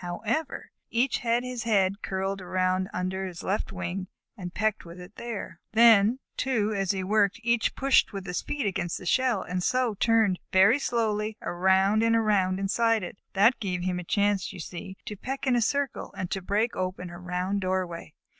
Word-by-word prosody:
However, 225 - -3 0.2
each 240 +2 +1
had 235 +1 +1
his 250 -1 -4
head 200 -3 +1
curled 195 0 -2
around 185 +1 0
under 185 +1 -2
his 175 -2 -8
left 205 +3 -1
wing, 185 0 -4 0.3
and 180 -5 -7
pecked 215 +2 -1
with 170 +1 -11
it 180 +3 -12
there. 210 -7 -6
Then, 225 0 +6 0.2
too, 220 -5 0
as 195 -2 -1
he 190 0 0
worked, 205 +1 +2
each 235 -1 +1
pushed 275 0 +3
with 195 -2 -6
his 180 -2 -2
feet 290 -4 -3
against 175 -3 -1
the - - -10
shell, 250 +2 +2
and 180 0 -3
so 250 +3 +1
turned 220 -3 +2
very 195 +8 +5
slowly 220 -4 -1
around 190 +4 +3
and 230 0 +3
around 195 -4 +2
inside 225 +2 +1
it. 180 +2 -7
That 210 +6 +4
gave 180 -4 -2
him 180 -1 -1
a - - -5
chance, 200 +1 +1
you - - -10
see, 185 +3 -7
to 210 - -5
peck 270 +8 -5
in 255 -2 +3
a 240 - +2
circle 280 +3 -1
and 185 -1 -3
so 195 - -3
break 210 +5 0
open 185 -1 -4
a 175 - -9
round 180 +2 -2
doorway. 185 -4 -3
195 Hz, 190 wpm, -27 LUFS, 185-230 Hz, 0.3 s, Then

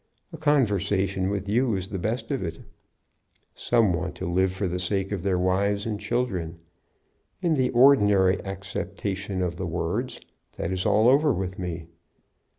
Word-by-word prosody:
A - - -6
conversation 100 - +1
with 100 -1 -3
you 115 +2 +1
is 95 0 -4
the 95 - -4
best 115 +6 -3
of 135 - -1
it. 85 -2 -5 0.9
Some 115 -6 +2
want 90 +1 -3
to 95 - -5
live 95 +2 +1
for 95 +1 -2
the 90 +1 -3
sake 95 +2 -1
of 100 -4 -2
their 95 0 0
wives 100 +3 +1
and 105 -2 -3
children. 90 -11 -2 0.9
In 170 -2 +2
the 130 -4 +2
ordinary 105 -7 +4
acceptation 95 0 -4
of 85 -1 -3
the 95 - -3
words, 90 +9 -3 0.4
that 85 - -3
is 95 0 -1
all 110 +2 +4
over 145 +4 +5
with 95 -4 -3
me. 85 -2 -4
95 Hz, 160 wpm, -25 LUFS, 90-110 Hz, 0.9 s, over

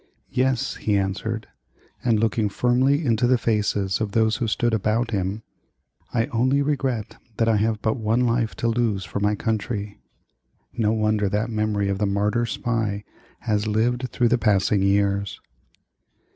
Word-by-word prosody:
"Yes," 130 -1 0
he 105 -2 +1
answered; 100 +4 -2 0.6
and 115 -3 +2
looking 110 -1 +1
firmly 130 +8 +2
into 115 -1 +2
the 130 0 +4
faces 105 -3 0
of 105 -2 -2
those 110 -1 +2
who 115 - -1
stood 120 +2 0
about 110 +2 0
him, 100 +1 -2 0.7
"I 115 -1 +1
only 130 +5 +2
regret 135 -6 -2 0.2
that 115 - +2
I 110 -2 +3
have 110 0 0
but 110 +3 +1
one 115 +2 +1
life 115 -2 +1
to 115 - -1
lose 115 -5 0
for - - -4
my 105 +1 +1
country," 105 -1 -3 0.7
No 110 -2 +1
wonder 110 -2 +1
that 105 +4 -1
the - - -6
memory 105 -2 0
of 100 0 -1
the 105 - +1
Martyr 105 +4 0
Spy 110 -4 -2 0.4
has 105 0 0
lived 120 +4 0
through 120 -2 +1
the 120 +1 +2
passing 100 -2 +2
years! 100 0 +1
110 Hz, 160 wpm, -23 LUFS, 105-120 Hz, 0.7 s, the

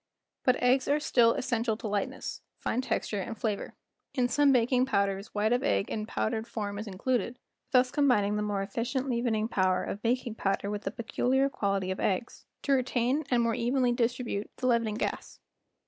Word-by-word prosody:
But 255 - +4
eggs 255 +2 +2
are 290 +2 +3
still 235 -5 +4
essential 235 -4 -1
to 225 - -5
lightness, 205 -1 -3 0.2
fine 250 - -1
texture, 210 -5 -2
and 225 +4 -5
flavor. 210 -4 -3 0.4
In 250 -3 +2
some 285 +2 +4
baking 255 +1 +3
powders 200 -2 0
white 215 +3 +2
of 245 - +2
egg 100 -1 0
in 215 -1 -3
powdered 220 0 -2
form 205 -3 -4
is 215 - -6
included, 240 +5 -1 0.3
thus 250 -1 +4
combining 250 -9 +3
8 - - 0
The - - 0
Making 210 - -2
o/ 195 - 0
BISCUITS 195 +1 -6
the - - 0
more - - +2
efficient 260 +2 -2
leavening 235 -2 0
power 185 -4 +1
of 205 - -5
baking 240 0 0
powder 200 -1 -1
with 210 0 -4
the - - +1
peculiar! 255 +4 0
quality 195 -5 -1
of 190 - -4
eggs 195 +4 -2 0.2
to 280 - 0
retain 255 +2 +1
and 240 -2 +3
more 230 0 +1
evenly 245 +2 +1
distribute 240 -3 -1
the - - -4
leavening 230 -3 +2
gas. - - -4
230 Hz, 200 wpm, -29 LUFS, 210-250 Hz, 0.4 s, But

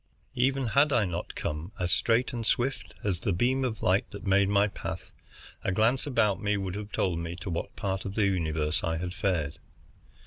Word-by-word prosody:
Even 135 +2 +2
had 140 +6 +4
I 120 -6 +3
not 90 -1 -4
come 75 +6 -4
as 90 -1 0
straight 120 +7 +2
and 120 -1 -3
swift 120 -2 0
as 95 -5 0
the 100 - -1
beam 125 +9 +2
of 115 -4 -2
light 95 +6 +2
that 100 -1 -9
made 100 0 +4
my 100 0 +4
path, - - -6 0.5
a - - +1
glance 115 +8 +2
about 105 -8 +2
would 100 -3 0
have 105 +1 -6
told 85 -3 0
me 85 0 -4
to 95 +1 -5
what 85 - -4
part 95 -1 -2
of 100 0 -5
the 110 - +3
universe 80 -3 0
I 80 0 0
had 90 +1 -4
fared. 90 -7 -1
100 Hz, 200 wpm, -29 LUFS, 90-115 Hz, 0.5 s, had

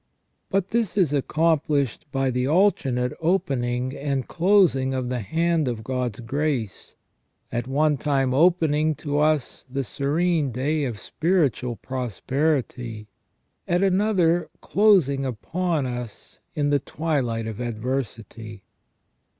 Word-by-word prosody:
But 195 -1 0
this 220 -5 0
is 170 -7 +3
accomplished 150 -2 +1
by 135 -1 0
the 125 +1 0
alternate 135 -8 +2
opening 130 -7 0
and 140 -2 -2
closing 170 -8 +3
of 130 -1 -2
the 125 -1 -2
hand 165 - 0
of 115 -3 -3
God's 125 -2 -3
grace, 130 -3 -3 0.6
at 120 +1 -2
one 150 +2 +2
time 135 -2 +1
opening 155 -1 +3
to 145 0 -2
us 150 -3 +1
the 135 +1 -2
serene 150 +3 0
day 145 +5 0
of 115 -5 -4
spiritual 150 - 0
prosperity, 125 -2 -2 0.6
at 175 +2 +2
another 185 -3 +2
closing 185 -10 +3
upon 155 +5 -2
us 120 -3 -7 0.2
in 145 -1 +1
the 145 - +3
twi 155 +2 -1
light 115 -3 -2
of 110 -1 -6
adversity. 115 -3 -4
140 Hz, 120 wpm, -24 LUFS, 125-160 Hz, 0.6 s, is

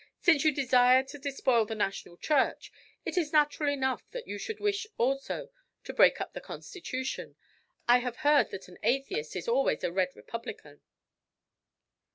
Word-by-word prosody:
"Since 320 -6 +4
you 310 - +5
desire 255 -2 +4
to 275 +2 -10
despoil 265 -4 +1
the 220 - -5
National 195 -4 -3
Church, 295 - +1 0.3
it 365 - 0
is 305 -4 -2
natural 295 -1 +3
enough 265 -2 -1
that - - -7
you 205 - -5
should 440 - -5
wish 410 0 -1
also 275 - -1 0.3
to - - -7
break - - +5
up - - -5
the - - -6
Constitution. 260 -8 -6 0.5
I 245 +1 +7
have 245 -1 -4
heard 295 0 +5
that 195 - -8
an 180 - -15
atheist 230 - -1
is 180 - -4
always 255 +4 +1
a - - 0
red 185 0 0
republican." 210 - -8
265 Hz, 165 wpm, -30 LUFS, 230-295 Hz, 0.5 s, I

